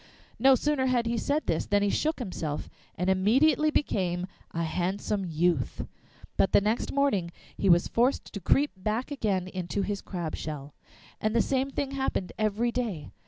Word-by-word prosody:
No 265 +3 +7
sooner 280 -1 +1
had 245 -2 +2
he 230 +1 0
said 285 +6 0
this 160 - -1
than 205 0 +2
he 205 - +2
shook 315 +1 0
himself, 170 - -4 0.2
and 180 - -2
immediately 250 +12 +4
became 180 -12 0 0.2
a 170 - -2
handsome 185 +4 -1
youth, 165 -4 0 0.5
but 195 - +2
the - - +8
next 215 +3 -1
morning 275 -12 +1 0.3
he 195 - +1
was 175 0 +5
forced 245 +4 +1
to 200 - -4
creep 285 - +3
back 215 +8 -2
again 200 -9 -1
into 185 +1 -3
his 200 +1 -3
crab 170 -4 -4
shell. 150 -2 -6 0.5
And 215 +1 0
the - - +5
same 270 0 0
thing 275 0 -3
happened 265 -9 -2
every 215 +3 +1
day. 220 - -3
205 Hz, 170 wpm, -28 LUFS, 180-260 Hz, 0.5 s, the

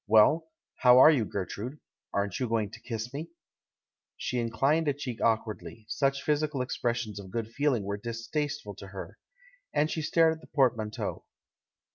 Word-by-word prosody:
Well, 110 +10 +5 0.3
how 125 0 +7
are 140 +5 +10
you, 130 -8 +2
Ger 100 -2 -3
trude? 125 +12 -6 0.3
Aren't 100 -2 -1
you 125 -3 -1
going 110 -3 0
to 115 - -10
kiss 115 +1 -5
me?" 155 +4 -5 0.9
She 125 - -2
inclined 135 +7 +1
a 145 - +2
cheek 130 -5 -5
awkwardly 110 0 -1
— - - -27
such 140 +2 +1
physical 150 -3 +1
expressions 115 -4 -2
of 95 -2 -9
good 115 +2 -3
feeling 135 -3 +1
were 100 +1 -3
distasteful 120 +2 -3
to 100 - -9
her 95 0 -8 0.3
— - - -31
and 155 +1 +2
stared 160 +1 +3
at 160 - -11
the - - -15
portmanteau. 115 -6 0
120 Hz, 170 wpm, -29 LUFS, 110-145 Hz, 0.9 s, are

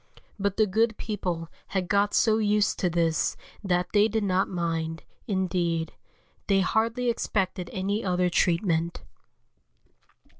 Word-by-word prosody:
But 200 -1 -1
the 215 - +5
good 220 +2 +1
people 180 -6 -3 0.2
had 185 -2 -2
got 200 +2 +2
so 220 -1 +3
used 210 -1 +2
to 180 - +1
this 165 -1 +1 0.3
that 180 -2 0
they 210 0 +5
did 220 0 -1
not 190 -1 +1
mind, 165 -2 -2 0.2
indeed, 175 -4 -1 0.5
they 195 -1 +3
hardly 230 +5 0
expected 190 -5 -1
any 200 +3 -2
other 180 -1 +1
treatment. 170 -1 +1
190 Hz, 125 wpm, -27 LUFS, 175-210 Hz, 0.5 s, the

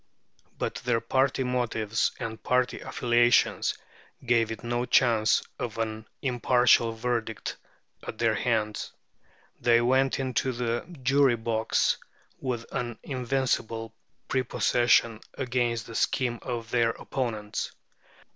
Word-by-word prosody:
But - - -2
their 120 -2 +2
party 130 +3 +1
motives 115 -3 0
and 110 -3 -5
party 125 +1 +1
affiliations 120 0 +2 0.5
gave 115 -2 +3
it 110 - -6
no 120 +1 -1
chance 115 -3 +3 0.2
of 120 -4 -4
an 110 -1 -3 0.2
impartial 125 -2 +3
verdict 115 -1 -3 0.4
at - - -7
their - - +2
hands. 110 -3 -1 0.7
They 120 -1 +4
went 130 +3 +2
into 130 -1 0
the 120 +3 -2 0.2
jury 135 -1 +4
box 110 -1 +1 0.4
with 120 -3 -3
an 120 -2 -3
invincible 125 -4 -1 0.3
prepossession 120 -3 +2 0.2
against 120 -3 -1
the 115 - -10
scheme 120 +1 0
of 115 -2 -5
their 120 -1 +3
opponents. 110 -3 -3
120 Hz, 110 wpm, -27 LUFS, 115-125 Hz, 0.7 s, They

